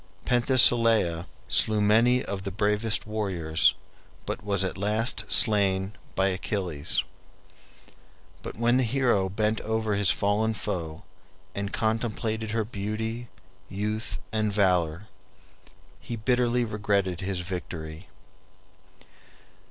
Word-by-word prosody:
Penthesilea 115 -8 +5 0.2
slew 110 -1 +3
many 115 +5 +3
of 100 -1 -4
the 100 - -5
bravest 105 +2 0
warriors, 95 -7 +1 0.5
but - - -5
was 100 -2 0
at 95 - -3
last 105 +4 -1
slain 100 -3 +3 0.2
by 95 +1 +2
Achilles. 90 -5 -2 1.4
But - - -8
when 120 +2 +2
the 130 - +2
hero 120 -6 +1
bent 105 +2 -1
over 110 -1 -1
his 100 -1 +1
fallen 110 +2 +1
foe, 80 -6 -5 0.5
and 100 0 -4
contemplated 110 -1 -2
her 110 0 -1
beauty, 110 +3 -4 0.4
youth, 105 +3 -3
and 110 -1 0
valor, 90 -2 +1 0.9
he 120 - -6
bitterly 120 +1 +1
regretted 100 -4 -1
his 95 -1 -3
victory. 85 -2 -7
105 Hz, 105 wpm, -26 LUFS, 95-110 Hz, 1.4 s, Penthesilea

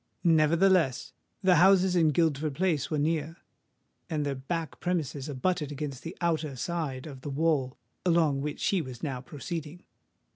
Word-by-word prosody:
Nevertheless, 165 -2 +3 0.3
the 185 -2 +5
houses 190 +1 +5
in 165 -3 +4
Guildford 155 -2 +1
Place 170 -4 0
were 155 - -1
near; 155 +2 -1 0.7
and 150 -2 -1
their 140 - -1
back 160 +5 -4
premises 155 -5 -2
abutted 150 +2 -1
against 140 -2 -5
the 165 +2 -8
outer 160 -5 -1
side 140 -2 -3
of 135 -4 -9
the 145 - -5
wall 140 -3 0 0.3
along 165 -6 +2
which 150 +1 -3
he 195 -3 +2
was 130 -5 -9
now 135 -5 -3
proceeding. 160 +4 -6
155 Hz, 150 wpm, -28 LUFS, 140-170 Hz, 0.7 s, the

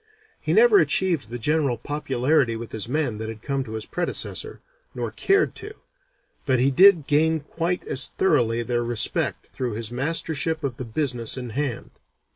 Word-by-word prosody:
He - - -3
never 450 -3 +6
achieved 170 - +1
the 120 - -5
general 140 0 0
popularity 135 -1 0
with 115 0 -7
his 110 +1 -5
men 130 -6 -1
that 110 0 -4
had 110 -1 -9
come 140 -2 -1
to 110 - -8
his 110 -1 -5
predecessor, 175 -1 -3 0.4
nor - - -3
cared 395 0 +2
to, 425 +1 -8 0.7
but 130 -2 +3
he 130 +3 +2
did 180 +1 +6
gain 160 +2 +2
quite 165 +4 -3
as 135 - +3
thoroughly 120 -10 +1
their 120 0 -1
respect 120 -2 -1
through 125 -3 -3
his 115 +1 -4
mastership 160 +3 -1
of 130 -4 -3
the 130 - -5
business 120 -1 -1
in 125 -2 -6
hand. 135 0 -3
135 Hz, 170 wpm, -24 LUFS, 120-160 Hz, 0.7 s, never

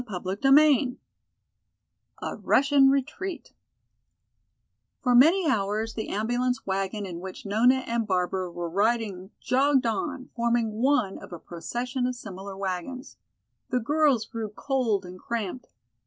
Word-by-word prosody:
CHAPTER 185 -1 -3
XI 275 -1 +5 1.3
A - - -3
Russian 275 0 +4
Retreat 320 +7 -2 1.5
For 250 -2 +3
many 325 +9 +6
hours 215 -2 0
the 220 - -5
ambulance 245 +4 -1
wagon 195 +2 -2
in 175 -3 -6
which 190 +3 -8
Nona 245 +6 +3
and 230 -2 -1
Barbara 185 -1 -1
were 170 0 -4
riding 200 0 0
jogged 270 0 +2
on, 260 +5 -3
forming 235 -2 +1
one 250 -7 +2
of - - -12
a 175 - -6
procession 245 +11 -4
of 250 - -3
similar 195 -3 -8
wagons. 195 +7 -5 0.5
The 250 - +1
girls 280 -2 +2
grew 225 -1 -5
cold 220 -3 -1
and 180 +1 -10
cramped. 230 +2 -4
230 Hz, 125 wpm, -26 LUFS, 195-260 Hz, 1.5 s, many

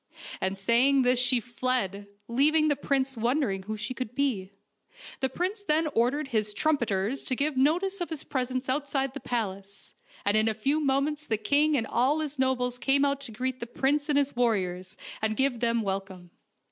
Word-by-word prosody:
And 190 +1 -1
saying 250 +7 +3
this 250 0 +3
she 250 0 +5
fled, 235 -5 -2 0.2
leaving 305 +6 +3
the 290 - +2
prince 270 -1 0
wondering 235 -4 0
who 215 +3 -5
she 215 +4 -4
could 250 -2 -6
be. 230 -10 -1 0.7
The 265 - +1
prince 375 - -3
then 315 -3 +2
ordered 270 +5 +1
his 215 -4 -1
trumpeters 240 -6 0
to 255 - -1
give 290 +2 0
notice 355 +8 +1
of 350 - -2
his 320 -4 -4
pres 255 -2 -2
ence 255 0 -3
outside 270 0 -1
the 280 - -6
palace, 200 -5 -5 0.3
and 205 +1 +3
in 215 +1 +3
a 220 - +1
few 275 +8 +1
moments 295 +1 0
the 220 - +1
king 290 +7 +2
and 225 - 0
all 260 +7 +2
his 300 -3 -4
nobles 250 -1 0
came 275 +3 +3
out 280 0 0
to 275 - -2
greet 255 +3 -3
the 235 - -5
prince 285 +5 0
and 290 - +3
his 285 -2 +1
warriors, 190 -6 -1 0.2
and 220 0 -1
give 265 -3 +1
them 230 -1 +1
welcome. 190 -3 -5
255 Hz, 190 wpm, -27 LUFS, 220-280 Hz, 0.7 s, she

